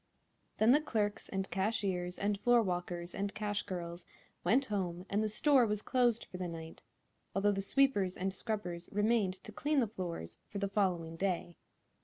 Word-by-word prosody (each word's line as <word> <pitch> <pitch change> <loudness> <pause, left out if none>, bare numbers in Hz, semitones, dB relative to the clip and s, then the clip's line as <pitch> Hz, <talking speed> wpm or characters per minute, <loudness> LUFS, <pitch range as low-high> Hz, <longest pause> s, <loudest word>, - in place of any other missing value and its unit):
Then 220 +2 +5
the 295 +4 +6
clerks 210 -8 -1
and 195 0 -2
cashiers 190 -3 -1
and 200 0 -1
floorwalkers 180 -7 +1
and 200 0 -3
cash 205 -1 -1
girls 170 -1 -5 0.4
went 245 +10 +3
home 185 -5 -2
and 205 +2 +2
the 215 - +1
store 265 +4 +5
was 210 0 -1
closed 240 -3 +2
for 180 - -8
the 180 -1 -3
night, 165 -1 -8 0.5
although 200 +1 +3
the 195 -1 -1
sweepers 200 -5 +2
and 190 +1 -1
scrubbers 185 -5 -4
remained 210 -2 +2
to - - -8
clean 295 +7 +1
the 245 - +3
floors 180 - -5
for 205 - -5
the 200 0 0
following 175 -5 0
day. 175 -2 -1
200 Hz, 170 wpm, -34 LUFS, 180-215 Hz, 0.5 s, the